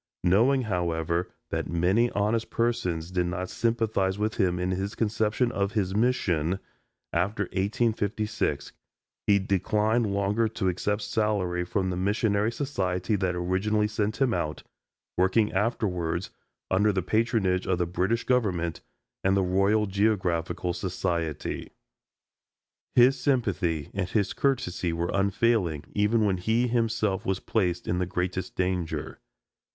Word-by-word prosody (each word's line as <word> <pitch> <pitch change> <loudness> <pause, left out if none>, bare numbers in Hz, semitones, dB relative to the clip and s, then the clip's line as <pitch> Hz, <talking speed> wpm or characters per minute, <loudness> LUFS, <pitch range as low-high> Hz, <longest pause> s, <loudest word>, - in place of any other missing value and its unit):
Knowing, 120 +9 +4
however, 85 -4 -1 0.2
that - - -2
many 95 +8 +2
honest 105 +3 0
persons 90 -8 -1
did 90 -1 0
not 90 +1 -3
sympathize 110 -5 0
with 105 +1 -1
him 90 -4 +2
in 90 +1 -1
this 95 +3 -2
conception 110 +2 +1
of 100 -1 -1
his 95 -4 0
mission, 95 -8 +1 0.6
after 100 +4 0
1856 105 +2 -1 0.6
he 100 - +6
declined 105 +3 +1
longer 100 +3 +1
to 110 -3 -2
accept 105 +4 -1
salary 100 -5 0
from 95 +1 -1
the - - -2
missionary 100 +3 +1
society 105 -7 -1
that 95 -2 0
originally 95 +4 +1
sent 105 +1 -2
him 130 -4 +2
out, 75 -6 -2 0.5
working 95 +4 +3
afterwards 95 -5 -1 0.4
under 105 +3 +4
the 95 -3 -1
patronage 105 -3 +1
of 95 - +1
the 90 - +1
British 95 +7 0
Government 90 -10 0 0.4
and 95 +1 +3
the 95 - +3
Royal 100 +4 +2
Geographical 95 -4 0
Society. 80 -3 -3 1.3
His 130 +2 +6
sympathy 95 - 0
and 95 -2 -2
his 100 -2 0
courtesy 105 -11 0
were 85 +1 -1
unfailing, 100 -5 +1
even 105 +2 +2
when 95 -2 +1
he 110 +7 +1
himself 115 -4 0
was 95 0 -1
placed 90 -5 -1
in 90 - 0
the 90 - 0
greatest 90 0 -3
danger. 90 -3 -2
100 Hz, 130 wpm, -27 LUFS, 90-110 Hz, 1.3 s, he